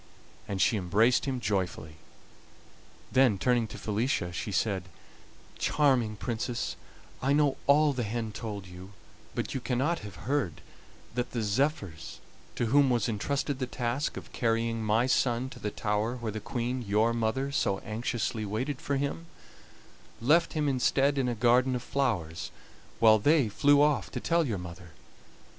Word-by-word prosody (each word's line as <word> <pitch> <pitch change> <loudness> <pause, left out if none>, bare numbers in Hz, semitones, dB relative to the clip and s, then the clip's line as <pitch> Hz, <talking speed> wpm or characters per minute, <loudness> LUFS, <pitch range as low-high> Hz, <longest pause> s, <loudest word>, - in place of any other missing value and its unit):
And 100 -1 -3
she 110 - +3
embraced 105 +6 +3
him 135 -2 -2
joyfully. 95 -7 -2 1.1
Then, 130 -6 +4
turning 120 +1 +2
to 105 - -9
Felicia, 105 -4 -1
she 100 - -4
said: 95 -2 0 0.7
"Charming 130 -7 +2
Princess, 120 +2 -3 0.5
I 135 +2 +2
know 145 -2 +3
all 145 +1 +5
the 125 - -2
hen 110 0 -3
told 105 -2 -6
you, 90 +2 -11 0.4
but - - -2
you 135 - -3
cannot 135 +8 0
have 100 -4 -10
heard 130 - -1 0.5
that 125 +1 -3
the 115 -2 -1
zephyrs, 100 - -1 0.4
to - - 0
whom 140 +4 +4
was 120 -4 +1
entrusted 135 +5 -2
the 130 - -2
task 125 +4 -2
of - - -10
carrying 115 -1 0
my 110 +3 +2
son 125 0 +1
to - - -10
the 105 - -2
tower 105 +3 -1
where 115 -3 -4
the 110 - -4
Queen, 125 +2 -3
your 110 +2 +2
mother, 120 +4 -1
so 100 -8 +1
anxiously 110 -1 -2
waited 125 +7 -3
for 140 - -1
him, 145 +4 -3 0.9
left 155 +9 +3
him 150 -2 0
instead 135 +1 +2
in 125 -2 +1
a 120 - -1
garden 125 +3 +3
of 125 - -4
flowers, 90 - -1 0.5
while 110 -1 +6
they 145 0 +3
flew 145 +7 +4
off 150 -1 +1
to - - -4
tell 170 -2 +1
your 110 -5 -1
mother. 85 -1 -9
120 Hz, 155 wpm, -29 LUFS, 105-135 Hz, 1.1 s, while